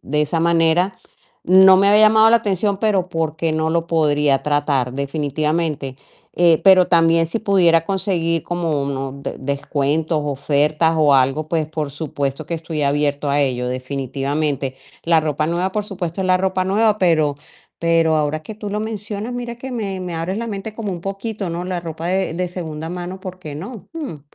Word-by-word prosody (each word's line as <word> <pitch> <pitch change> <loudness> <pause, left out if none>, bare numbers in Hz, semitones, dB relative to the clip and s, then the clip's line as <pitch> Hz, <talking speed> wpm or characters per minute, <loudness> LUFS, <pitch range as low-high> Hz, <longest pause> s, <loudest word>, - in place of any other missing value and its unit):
de 150 +2 0
esa 155 +2 -1
manera, 170 +3 +3 0.5
no 190 +1 +7
me 195 +1 +4
había 210 +1 +6
llamado 220 +1 +5
la 235 - +6
atención, 200 -1 -1
pero 200 -5 +1
por 160 -2 -2
qué 165 -1 -1
no 160 0 0
lo 165 0 0
podría 150 -4 +2
tratar, 145 -4 0
definitivamente, 145 0 -2 0.4
eh, 170 -2 +4
pero 185 -2 +6
también, 165 -1 +3
si 170 - -3
pudiera 175 -6 +3
conseguir 170 -4 -1
como 165 -5 -1
unos 135 -1 -4 0.2
descuentos, 145 +3 -1
ofertas 150 +3 +1
o 150 -2 +4
algo, 135 +4 +2
pues, 160 -1 0
por 155 -2 -4
supuesto 140 0 -4
que 170 - -3
estoy 160 -2 -4
abierto 145 0 0
a 145 +1 +2
ello, 125 -3 0
definitivamente, 135 +2 -3 0.3
la 165 -1 +3
ropa 155 -1 -1
nueva, 175 +3 -1
por 210 0 -2
supuesto, 185 -3 -5
es 190 - -1
la 185 0 +4
ropa 185 0 0
nueva, 210 +2 +2
pero 155 -6 +2 0.4
pero 165 -1 +2
ahora 155 0 -1
que 215 - -8
tú 210 0 -7
lo 205 +1 -2
mencionas, 215 +1 -5
mira 240 -1 -5
que 260 +2 -7
me 200 -5 -3
me 180 -2 -5
abres 165 +4 -3
la 230 +1 -3
mente 210 0 -6
como 215 -3 -4
un 175 - -6
poquito, 195 +1 -4
¿no?, 170 +1 -4
la 180 -1 -3
ropa 165 -1 -6
de 190 -3 0
de 180 +1 -2
segunda 160 -3 -6
mano, 180 +1 -6
¿por 185 -1 -8
qué 155 -5 -8
no?, 200 - -8
Mm. 285 - -6
165 Hz, 185 wpm, -19 LUFS, 150-190 Hz, 0.5 s, no